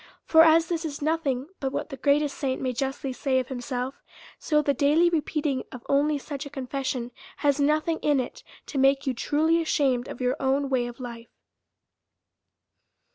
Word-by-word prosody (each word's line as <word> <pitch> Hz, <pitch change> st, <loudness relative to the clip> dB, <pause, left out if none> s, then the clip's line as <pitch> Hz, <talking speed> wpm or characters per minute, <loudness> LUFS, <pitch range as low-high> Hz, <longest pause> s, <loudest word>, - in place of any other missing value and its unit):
For 320 Hz, -, +6 dB
as 325 Hz, 0 st, +5 dB
this 335 Hz, 0 st, -2 dB
is 295 Hz, -3 st, -4 dB
nothing 290 Hz, -3 st, -1 dB
but 270 Hz, -2 st, -2 dB
what -, -, -3 dB
the 270 Hz, -, -6 dB
greatest 285 Hz, +1 st, +1 dB
saint 265 Hz, -2 st, -2 dB
may 255 Hz, -1 st, -1 dB
justly 270 Hz, +1 st, -3 dB
say 260 Hz, +1 st, 0 dB
of 255 Hz, -1 st, -1 dB
himself; 250 Hz, 0 st, -4 dB, 0.4 s
so 300 Hz, -2 st, +2 dB
the 280 Hz, -, +2 dB
daily 300 Hz, +6 st, +3 dB
repeating 300 Hz, -4 st, -1 dB
of 250 Hz, -2 st, -10 dB
only 290 Hz, +2 st, +2 dB
such 285 Hz, 0 st, -6 dB
a 285 Hz, -, -8 dB
confession 260 Hz, -2 st, -3 dB, 0.3 s
has 285 Hz, -1 st, +1 dB
nothing 305 Hz, +3 st, +1 dB
in 295 Hz, -2 st, +2 dB
it 255 Hz, -, -5 dB, 0.2 s
to 275 Hz, -, -3 dB
make 275 Hz, +1 st, +3 dB
you 265 Hz, -, 0 dB
truly 315 Hz, +7 st, +1 dB
ashamed 270 Hz, -6 st, +1 dB
of -, -, -8 dB
your 250 Hz, 0 st, +1 dB
own 275 Hz, +1 st, +1 dB
way 245 Hz, -2 st, +1 dB
of 240 Hz, +1 st, -9 dB
life. 235 Hz, -2 st, -8 dB
275 Hz, 180 wpm, -26 LUFS, 260-300 Hz, 0.4 s, For